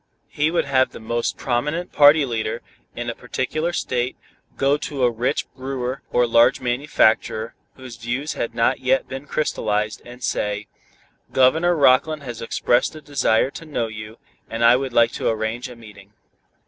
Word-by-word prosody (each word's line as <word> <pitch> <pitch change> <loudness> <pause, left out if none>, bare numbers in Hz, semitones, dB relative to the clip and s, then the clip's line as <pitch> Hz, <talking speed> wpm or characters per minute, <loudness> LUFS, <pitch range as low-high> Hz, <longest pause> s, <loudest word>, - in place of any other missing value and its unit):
He 150 +2 +1
would 170 - 0
have 130 -2 +2
the - - -9
most 115 +1 -2
prominent 150 +8 -2
party 145 0 +6
leader, 115 -1 -3 0.3
in 120 0 -5
a 120 - -2
particular 150 +8 -3
state, 125 -6 -2 0.4
go 135 +1 +3
to 140 -3 -4
a 120 - +4
rich 120 +2 -1
brewer 130 0 -4
or 125 - +3
large 115 0 +4
manufacturer, 120 -3 +1 0.2
whose 130 -3 -10
views 120 +6 -3
had 115 - -4
not 115 -1 +2
yet 130 +1 +1
been 135 +2 -7
crystallized, 105 -8 -1
and 125 +1 -12
say, 105 0 -1 0.7
"Governor 160 +7 +4
Rockland 145 +1 +3
has 120 -4 -7
expressed 120 +4 +1
a 155 - -9
desire 135 -3 +1
to 165 - -9
know 145 -7 -2
you, 105 0 -8 0.3
and 115 +1 0
I 120 +1 +7
would 135 0 -2
like 115 -1 +4
to - - -1
arrange 110 +3 -2
a 125 - -10
meeting." 105 -3 -15
125 Hz, 165 wpm, -22 LUFS, 115-140 Hz, 0.7 s, I